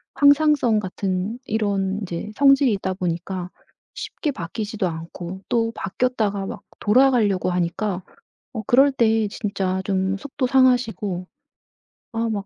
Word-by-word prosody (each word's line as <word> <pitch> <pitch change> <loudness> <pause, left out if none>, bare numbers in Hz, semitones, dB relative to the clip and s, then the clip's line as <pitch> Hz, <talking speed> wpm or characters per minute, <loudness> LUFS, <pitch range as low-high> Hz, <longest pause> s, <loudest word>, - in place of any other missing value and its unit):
항상성 285 -5 +4
같은 190 +3 -3
이런 200 -2 0
이제 180 +1 -5
성질이 275 -2 +5
있다 190 -1 -2
보니까 180 0 -3 0.4
쉽게 300 - -4
바뀌지도 205 0 -3
않고 170 +3 -7
또 230 -1 +1
바뀌었다가 205 -2 -1
막 - - -7 0.2
돌아가려고 215 -5 +3
하니까 180 +2 -1 0.5
어. 220 - -4
그럴 270 +3 +5
때 225 -4 +2
진짜 195 -4 -2
좀 190 0 0
속도 270 +2 -3
상하시고 245 -8 +2 0.9
아 230 0 -1
막 205 -3 -3
210 Hz, 265 characters per minute, -22 LUFS, 190-245 Hz, 0.9 s, 성질이